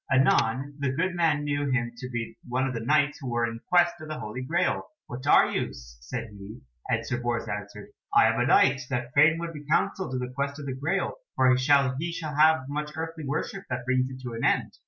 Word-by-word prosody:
Anon 135 Hz, +1 st, +2 dB
the 140 Hz, -2 st, 0 dB
good 185 Hz, +6 st, 0 dB
man 160 Hz, -4 st, +1 dB
knew 145 Hz, -1 st, -1 dB
him 120 Hz, -3 st, 0 dB
to 125 Hz, +1 st, -6 dB
be 120 Hz, -2 st, -4 dB
one 130 Hz, +2 st, +1 dB
of 130 Hz, -, -2 dB
the 115 Hz, -, -3 dB
Knights 145 Hz, +4 st, +2 dB
who 130 Hz, -, -4 dB
were 120 Hz, 0 st, +1 dB
in 115 Hz, -1 st, -5 dB
quest 175 Hz, -1 st, +3 dB
of 155 Hz, -, -8 dB
the 155 Hz, 0 st, -5 dB
Holy 105 Hz, +4 st, -5 dB
Graal. 170 Hz, +7 st, 0 dB, 0.2 s
"What 130 Hz, +3 st, -7 dB
are -, -, +6 dB
you?" -, -, -2 dB
said 60 Hz, -, -8 dB
he, 100 Hz, +3 st, -11 dB, 0.3 s
and -, -, 0 dB
Sir 120 Hz, -1 st, -2 dB
Bors 120 Hz, -1 st, -2 dB
answered, 105 Hz, 0 st, -6 dB, 0.2 s
"I -, -, +6 dB
am -, -, -2 dB
a -, -, +2 dB
Knight 135 Hz, +1 st, +4 dB
that 120 Hz, 0 st, -3 dB
fain 155 Hz, +2 st, +5 dB
would 170 Hz, 0 st, -5 dB
be 150 Hz, -1 st, -8 dB
counselled 165 Hz, +2 st, 0 dB
in -, -, -1 dB
the 125 Hz, -, -12 dB
quest 140 Hz, +2 st, -2 dB
of 145 Hz, -, -7 dB
the 135 Hz, -, -3 dB
Graal, 140 Hz, -, -1 dB, 0.2 s
for 130 Hz, -1 st, +4 dB
he 125 Hz, -, +4 dB
shall 140 Hz, -1 st, +3 dB, 0.4 s
have 155 Hz, -2 st, +4 dB
much 150 Hz, +1 st, -4 dB
earthly 160 Hz, -2 st, -5 dB
worship 160 Hz, +7 st, -3 dB
that 120 Hz, -1 st, -3 dB
brings 130 Hz, 0 st, +1 dB
it 130 Hz, -1 st, -9 dB
to 120 Hz, -2 st, -5 dB
an 115 Hz, -, -5 dB
end." -, -, +2 dB
130 Hz, 230 wpm, -27 LUFS, 120-150 Hz, 0.4 s, are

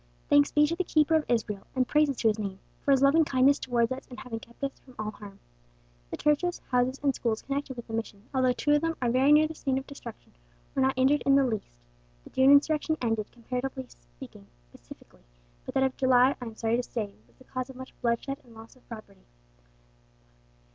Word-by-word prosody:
"Thanks 290 Hz, 0 st, +5 dB
be 295 Hz, 0 st, +4 dB
to 330 Hz, +3 st, -1 dB
the 370 Hz, -, -1 dB
Keeper 310 Hz, -2 st, +2 dB
of 315 Hz, -1 st, +1 dB
Israel, 215 Hz, -4 st, -1 dB
and 255 Hz, -1 st, +1 dB
praises 295 Hz, -3 st, +2 dB
to 225 Hz, -, +1 dB
His 215 Hz, 0 st, -1 dB
name, 195 Hz, -2 st, -4 dB, 0.3 s
for -, -, -3 dB
His 275 Hz, -1 st, +4 dB
loving 300 Hz, +4 st, +5 dB
kindness 275 Hz, 0 st, +3 dB
towards 235 Hz, -2 st, 0 dB
us 260 Hz, -, -5 dB
in 250 Hz, -, -11 dB
having 235 Hz, -4 st, -6 dB
kept 235 Hz, +4 st, -16 dB
us 275 Hz, -, -3 dB
from 255 Hz, -2 st, -18 dB
all 215 Hz, 0 st, -3 dB
harm. 205 Hz, -2 st, -12 dB, 0.7 s
The -, -, -5 dB
churches, 320 Hz, +4 st, +1 dB
houses, 250 Hz, +2 st, +1 dB
and 275 Hz, -1 st, +3 dB
schools 225 Hz, -3 st, -2 dB
connected 275 Hz, -1 st, -3 dB
with 240 Hz, -, -7 dB
the 225 Hz, -, -10 dB
Mission, 220 Hz, -3 st, -4 dB
although 260 Hz, -1 st, +3 dB
two 295 Hz, +4 st, -1 dB
of 295 Hz, 0 st, +4 dB
them 330 Hz, 0 st, -1 dB
are 245 Hz, -2 st, 0 dB
very 265 Hz, +4 st, +4 dB
near 305 Hz, +1 st, +6 dB
the 320 Hz, -, -7 dB
scene 270 Hz, -4 st, -2 dB
of 265 Hz, -, -4 dB
destruction, -, -, -11 dB, 0.4 s
were 270 Hz, -, 0 dB
not 265 Hz, 0 st, +2 dB
injured 270 Hz, +3 st, +3 dB
in 275 Hz, 0 st, +4 dB
the 275 Hz, -1 st, +4 dB
least. 220 Hz, -5 st, -3 dB, 0.5 s
The -, -, -15 dB
June 265 Hz, +1 st, +4 dB
insurrection 305 Hz, +2 st, +4 dB
ended, 225 Hz, -3 st, -2 dB
comparatively 250 Hz, -, -5 dB
speaking, -, -, -14 dB, 0.2 s
pacifically; -, -, -16 dB, 0.4 s
but -, -, -7 dB
that 265 Hz, -, +3 dB
of 265 Hz, -1 st, 0 dB
July, 260 Hz, +1 st, +4 dB
I -, -, -5 dB
am 225 Hz, -1 st, -8 dB
sorry 225 Hz, +1 st, 0 dB
to -, -, +1 dB
say, 215 Hz, -5 st, -4 dB
was -, -, -29 dB
the -, -, -18 dB
cause 255 Hz, 0 st, -5 dB
of 265 Hz, -, -10 dB
much 260 Hz, +1 st, -10 dB
bloodshed 240 Hz, +4 st, -1 dB
and 235 Hz, -2 st, -18 dB
loss 225 Hz, +2 st, -13 dB
of 255 Hz, -, -26 dB
property. 220 Hz, -, -11 dB
260 Hz, 225 wpm, -28 LUFS, 230-280 Hz, 0.7 s, near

